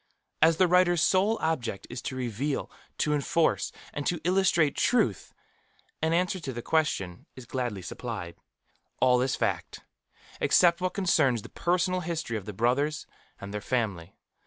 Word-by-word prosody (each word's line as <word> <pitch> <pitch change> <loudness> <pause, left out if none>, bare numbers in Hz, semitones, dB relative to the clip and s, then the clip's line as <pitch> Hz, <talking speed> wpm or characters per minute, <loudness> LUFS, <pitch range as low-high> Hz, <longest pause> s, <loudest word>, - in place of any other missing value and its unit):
As 160 +1 +5
the 185 - +5
writer's 175 -1 +4
sole 195 +5 +3
object 120 -11 -2
is 120 0 -5
to 130 - -5
reveal, 130 +3 -3 0.3
to 150 - +1
enforce, 160 +3 +1 0.2
and 145 - -3
to 175 - 0
illustrate 180 -4 +3
Truth, 175 - +1 0.7
an 160 +1 +1
answer 180 +3 +1
to 140 -6 -5
the 120 -1 -6
question 100 - -1
is 130 - -10
gladly 120 -7 -3
supplied. 90 -3 -6 0.6
All 125 -1 +4
is 130 0 0
fact, - - -2 0.6
except 170 -1 +4
what 185 0 -1
concerns 150 - +2
the - - -10
personal 180 +1 0
history 160 -8 -3
of 105 -4 -4
the - - -3
Brothers 140 +8 0 0.3
and 100 +1 -8
their 105 - -3
family. 100 -8 -2
145 Hz, 155 wpm, -28 LUFS, 120-175 Hz, 0.7 s, As